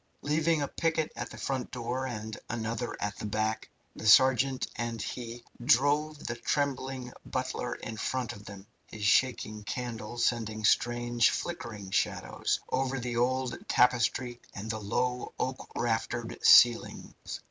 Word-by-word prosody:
Leaving 155 +1 +2
a - - -1
picket 160 0 0
at - - -5
the - - -10
front 130 -2 -2
door 125 +2 -3
and 110 -3 -5
another 115 +1 -3
at 105 -1 -2
the - - -5
back, 110 +1 -1 0.3
the 110 - -4
sergeant 130 +3 +5
and 115 -1 -3
he 120 +2 -5 0.2
drove 145 +3 +3
the 120 - -2
trembling 130 -1 -2
butler 130 -1 -3
in 110 - -7
front 125 +2 -2
of 100 - -12
them 100 -2 -10 0.2
his 105 - -8
shaking 110 -1 +2
candle 120 0 -5
sending 110 -3 0
strange, 120 +1 +3
flickering 110 - -5
shadows - - 0
over 135 +1 0
the 120 -1 -3
old 125 +1 +1
tapestries 125 0 +2 0.2
and 110 +2 -4
the 110 - -3
low, 125 +5 -1
oak 130 0 -3
raftered 115 0 -2
ceilings. 120 -1 +6
120 Hz, 140 wpm, -30 LUFS, 110-130 Hz, 0.3 s, ceilings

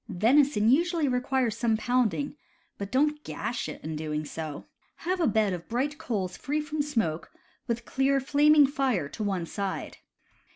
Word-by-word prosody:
Venison 230 +3 +3
usually 330 +4 +3
requires 255 -2 +1
g... 230 - -11
some 225 -2 +2
pounding, 250 +4 0 0.4
but 200 0 -5
don't 300 +3 +1
gash 240 0 -4
it - - -9
in 155 +1 -4
doing 150 0 -3
so. 155 -1 -6 0.4
Have 365 +1 0
a 330 - +3
bed 215 -3 +2
of 175 -1 -7
bright 275 +6 -1
coals 190 -6 -2
free 295 +2 -1
from 300 0 -2
smoke, 225 - -2 0.4
with 235 -1 -2
clear 270 +1 +2
flaming 290 +2 +5
fire 265 - 0
to 215 - -5
one 190 -4 -1
side. 195 +2 -4
245 Hz, 165 wpm, -28 LUFS, 200-285 Hz, 0.4 s, flaming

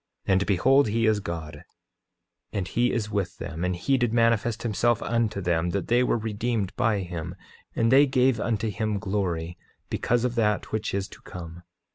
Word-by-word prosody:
8:23 - - 0
And 95 +1 +2
behold, 130 +8 +4
he 115 +2 +1
is 110 -1 +3
God, 80 -5 -6 0.9
and 95 -3 -2
he 120 +1 +1
is 110 -3 -2
with 95 -4 -2
them, 85 0 -5
and 90 0 0
he 130 +10 +1
did 120 -2 +1
manifest 115 -1 +2
himself 115 +1 +1
unto 115 -4 0
them, 85 -1 0
that 100 +2 -3
they 120 +1 +4
were 125 - +2
redeemed 110 -2 -2
by 115 -5 +1
him; 85 -1 -6 0.4
and 115 0 +2
they 140 +2 +7
gave 130 -3 +2
unto 110 0 -1
him 110 +1 -1
glory, 95 -5 -2 0.3
because 120 0 +1
of 125 - 0
that 105 -3 0
which 110 -2 -2
is 100 0 -2
to - - -14
come. 85 -1 -9
105 Hz, 185 wpm, -26 LUFS, 90-115 Hz, 0.9 s, they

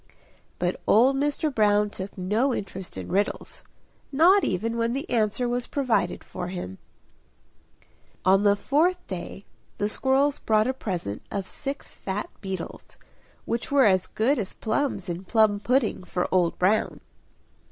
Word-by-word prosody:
'" - - -31
But - - -2
old 255 +5 +5
Mr. 290 +1 0
Brown 210 -2 +3
took 190 +1 -7
no 215 +8 +1
interest 190 - -6
in 90 -2 -6
riddles 200 +2 -2 0.5
not 350 +8 +5
even 225 +5 -1
when 230 0 0
the 275 +2 -3
answer 225 +1 +1
was 245 0 -1
provided 240 -10 0
for 180 - -6
him. 135 - -6 1.5
On 190 +1 +5
the 205 -1 +4
fourth 335 - +1
day 190 +1 -7 0.3
the 205 - 0
squirrels 270 +5 +1
brought 215 -1 +2
a 260 - 0
present 175 - -4
of 200 -2 -3
six 280 0 -5
fat 195 +2 -4
beetles, 190 -4 -7 0.5
which 230 +3 -3
were 280 -3 +5
as 185 -3 +3
good 250 +6 +1
as 200 - -4
plums 220 -4 -1
in 175 +1 -4
plum 215 0 +3
pudding 240 -2 +1
for 180 0 -2
Old 180 -2 +2
Brown. 195 +4 +1
215 Hz, 150 wpm, -26 LUFS, 190-265 Hz, 1.5 s, old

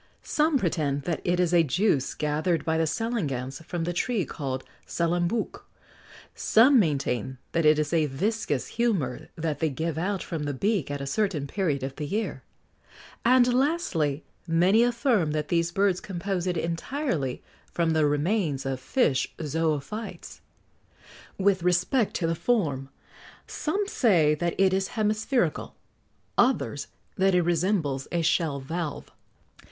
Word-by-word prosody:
Some 305 -1 +2
pretend 150 - -1
that 170 -3 -2
it 175 0 +1
is 180 -1 +2
a 175 - +6
juice 165 -2 +1
gathered 155 +3 0
by 160 0 +1
the 160 - +2
salangans 150 - -2
from 170 +1 -4
the 175 +1 -2
tree 210 +2 0
called 130 -4 -4 0.2
salambouc; 175 +5 -1 0.7
some 250 +4 +5
maintain 135 - 0
that 165 -2 +2
it 155 0 +6
is 150 +1 -1
a 160 -2 +3
viscous 160 - -1
humour 185 - 0
that 160 -2 -2
they 160 - +1
give 160 +3 -3
out 195 +2 -1
from 160 -4 -4
the 145 -1 -2
beak 200 - 0
at 145 -1 -4
a - - -3
certain 165 -1 -1
period 150 -5 -1
of 135 0 -5
the 150 -1 -4
year; 215 +7 -2 0.8
and, 245 0 +5
lastly, 245 - 0 0.2
many 180 +7 +4
affirm 235 - +2
that 150 -1 -2
these 170 0 +1
birds 195 0 +2
compose 185 -1 -3
it 180 -2 0
entirely 165 - -2 0.3
from 170 -1 +1
the 155 -2 +3
remains 150 -1 0
of 135 -1 -2
fish 140 - +1
zoophytes. 160 +6 -3 1.0
With 195 -1 +2
respect 180 +7 +1
to 170 - 0
the 165 - +1
form, 155 - 0 0.6
some 395 +7 -2
say 175 - +3
that 170 +3 -1
it 190 -1 +4
is 190 +3 -1
hemispherical; 215 +4 0 0.6
others 240 - +2 0.3
that 190 0 +4
it 180 - +4
resembles 165 -5 0
a 170 -1 0
shell 160 -3 +1
valve. 160 +3 -5
170 Hz, 145 wpm, -26 LUFS, 150-205 Hz, 1.0 s, a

